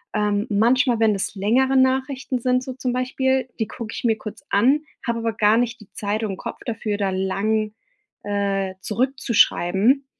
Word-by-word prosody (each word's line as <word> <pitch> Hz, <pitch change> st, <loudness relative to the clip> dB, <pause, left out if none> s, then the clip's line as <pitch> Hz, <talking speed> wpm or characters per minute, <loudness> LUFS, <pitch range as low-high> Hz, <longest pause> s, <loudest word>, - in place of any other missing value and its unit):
Ähm, 210 Hz, +1 st, 0 dB
manchmal, 235 Hz, +3 st, +3 dB
wenn 220 Hz, -1 st, +4 dB
das 200 Hz, +1 st, -3 dB
längere 255 Hz, +7 st, +2 dB
Nachrichten 260 Hz, 0 st, +1 dB
sind, 255 Hz, +1 st, +1 dB
so 260 Hz, -, -6 dB
zum 250 Hz, -1 st, -3 dB
Beispiel, 260 Hz, 0 st, 0 dB
die 220 Hz, -, 0 dB
gucke 225 Hz, 0 st, -7 dB
ich -, -, -6 dB
mir 225 Hz, -2 st, +2 dB
kurz 215 Hz, -1 st, -9 dB
an, 255 Hz, +9 st, +3 dB, 0.3 s
habe 235 Hz, 0 st, 0 dB
aber 225 Hz, 0 st, -1 dB
gar 210 Hz, +1 st, +3 dB
nicht 240 Hz, 0 st, 0 dB
die 215 Hz, -, -16 dB
Zeit 210 Hz, +2 st, -2 dB
und 195 Hz, -3 st, -3 dB
Kopf -, -, -7 dB
dafür, 220 Hz, -3 st, -2 dB
da 195 Hz, -2 st, 0 dB
lang, 210 Hz, +3 st, -1 dB, 0.5 s
äh, 200 Hz, -2 st, -1 dB
zurückzuschreiben. 235 Hz, 0 st, +2 dB
225 Hz, 170 wpm, -22 LUFS, 205-255 Hz, 0.5 s, wenn